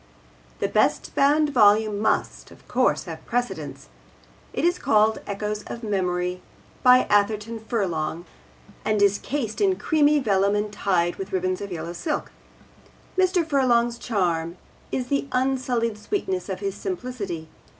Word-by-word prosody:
The -, -, 0 dB
best -, -, +1 dB
bound 290 Hz, +2 st, +3 dB
volume 215 Hz, -3 st, +4 dB
must, 215 Hz, -, -1 dB
of -, -, -18 dB
course, -, -, +1 dB
have -, -, -8 dB
precedence. 190 Hz, -, -3 dB, 0.6 s
It -, -, -1 dB
is 350 Hz, +1 st, +2 dB
called 215 Hz, +1 st, +3 dB
Echoes 210 Hz, +1 st, -3 dB
of 235 Hz, -, -7 dB
Memory, 180 Hz, -3 st, -1 dB, 0.4 s
by 250 Hz, 0 st, +7 dB
Atherton 210 Hz, +2 st, +1 dB
Furlong, 175 Hz, -7 st, -2 dB, 0.6 s
and 215 Hz, -1 st, +1 dB
is 200 Hz, 0 st, +3 dB
cased 245 Hz, -, -3 dB
in 385 Hz, -2 st, +3 dB
creamy 300 Hz, -4 st, +3 dB
vellum 200 Hz, -6 st, +2 dB
and 210 Hz, 0 st, -2 dB
tied 175 Hz, -4 st, 0 dB
with 195 Hz, 0 st, -6 dB
ribbons 185 Hz, 0 st, -1 dB
of 200 Hz, -1 st, -6 dB
yellow 170 Hz, 0 st, -5 dB
silk. 295 Hz, -, -3 dB, 0.8 s
Mr. 370 Hz, -3 st, +2 dB
Furlong's 240 Hz, -5 st, +2 dB
charm 175 Hz, -6 st, -1 dB, 0.3 s
is 250 Hz, -1 st, -2 dB
the 280 Hz, -1 st, 0 dB
unsullied 255 Hz, -4 st, 0 dB
sweetness 380 Hz, -, -2 dB
of -, -, -4 dB
his 395 Hz, -1 st, -2 dB
simplicity. 245 Hz, -, -5 dB
215 Hz, 140 wpm, -24 LUFS, 190-265 Hz, 0.8 s, by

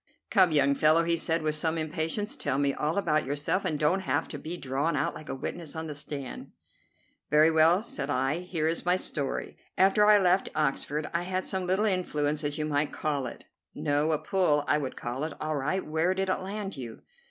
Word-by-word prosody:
"Come, 185 Hz, -5 st, +5 dB
young 140 Hz, -2 st, +4 dB
fellow," 155 Hz, +3 st, +4 dB
he 170 Hz, 0 st, +2 dB
said, 165 Hz, 0 st, 0 dB
with 155 Hz, -1 st, 0 dB
some 160 Hz, +1 st, 0 dB
impatience, 165 Hz, -, -2 dB
"tell 135 Hz, -, -2 dB
me 140 Hz, -1 st, +1 dB
all 155 Hz, +5 st, -1 dB
about 155 Hz, -6 st, +2 dB
yourself, 145 Hz, +7 st, -1 dB
and 160 Hz, -5 st, 0 dB
don't 155 Hz, +6 st, +2 dB
have 150 Hz, -4 st, -1 dB
to -, -, -6 dB
be 170 Hz, +3 st, -5 dB
drawn 140 Hz, +4 st, -1 dB
out -, -, 0 dB
like 155 Hz, -, -10 dB
a -, -, -3 dB
witness 160 Hz, +3 st, -5 dB
on 160 Hz, 0 st, -4 dB
the 155 Hz, -, -5 dB
stand." 145 Hz, -2 st, -6 dB, 0.8 s
"Very 155 Hz, +2 st, +5 dB
well," 165 Hz, +5 st, +4 dB
said 145 Hz, -10 st, -4 dB
I, 135 Hz, +3 st, 0 dB
"here 175 Hz, -3 st, -2 dB
is 165 Hz, +1 st, -1 dB
my 180 Hz, +1 st, +2 dB
story. 140 Hz, -6 st, -3 dB, 0.2 s
After 195 Hz, +2 st, +5 dB
I 210 Hz, 0 st, +8 dB
left 185 Hz, -1 st, +2 dB
Oxford 150 Hz, +1 st, 0 dB
I 170 Hz, -, +1 dB
had 185 Hz, +1 st, -2 dB
some 190 Hz, -1 st, -2 dB
little 190 Hz, +4 st, +2 dB
influence, 155 Hz, -6 st, 0 dB
as 145 Hz, 0 st, -2 dB
you 155 Hz, -, -1 dB
might 150 Hz, 0 st, 0 dB
call 145 Hz, -4 st, -2 dB
it." -, -, -10 dB, 0.3 s
"No, 145 Hz, +2 st, +1 dB
a 155 Hz, -, +2 dB
'pull,' 150 Hz, -5 st, +1 dB
I 150 Hz, -, +3 dB
would 135 Hz, -3 st, -4 dB
call 120 Hz, +4 st, -4 dB
it. 160 Hz, -, -3 dB
All 155 Hz, 0 st, -2 dB
right, 150 Hz, +7 st, -1 dB
where 160 Hz, +4 st, +1 dB
did 190 Hz, 0 st, -1 dB
it 185 Hz, -, +1 dB
land 195 Hz, -1 st, -5 dB
you?" 120 Hz, -4 st, -8 dB
155 Hz, 215 wpm, -28 LUFS, 145-180 Hz, 0.8 s, I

